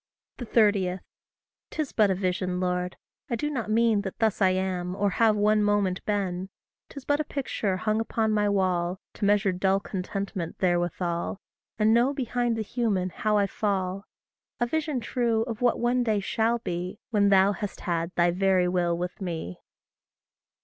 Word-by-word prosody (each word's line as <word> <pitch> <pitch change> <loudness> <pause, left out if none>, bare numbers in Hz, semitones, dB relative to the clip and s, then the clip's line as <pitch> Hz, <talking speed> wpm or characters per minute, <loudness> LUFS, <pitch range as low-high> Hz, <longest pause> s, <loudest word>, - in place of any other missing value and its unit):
30. 205 -6 +2 0.7
'Tis 310 -3 -3
but 210 -2 +4
a 190 - +2
vision, 180 -1 -1
Lord; 180 0 -1 0.3
I 240 - 0
do 295 +6 -2
not 235 -7 -3
mean 225 -1 +3
That 190 -2 -6
thus 220 -3 +1
I 190 - +6
am, 185 -1 -1
or 200 0 +1
have 220 +2 +3
one 210 +1 +3
moment 205 -3 +1
been 190 -3 -2 0.4
'Tis 280 -2 -10
but 290 0 +1
a - - +1
picture 225 -9 -2
hung 215 +2 0
upon 225 -1 0
my 210 -1 +2
wall, 185 -2 0
To - - -3
measure 205 -1 +3
dull 190 +2 +1
contentment 190 -3 -4
therewithal, 175 0 -1 0.4
And 215 +1 +4
know 245 +5 +3
behind 245 -3 0
the 220 - -1
human 205 -5 -1
how 215 +3 0
I 200 - +3
fall; 195 -1 -2 0.5
A 240 - +2
vision 300 -1 -1
true, 230 -2 0
of 230 -1 -6
what 245 -1 +2
one 245 +1 +2
day 215 -3 +1
shall 225 +4 +1
be, 180 -3 -4
When 205 -2 +3
thou 195 0 +5
hast 205 0 -5
had 170 -2 -1
thy 175 0 +3
very 185 0 +2
will 175 -1 +1
with 180 +4 -5
me. 165 - -4
200 Hz, 170 wpm, -27 LUFS, 185-225 Hz, 0.7 s, I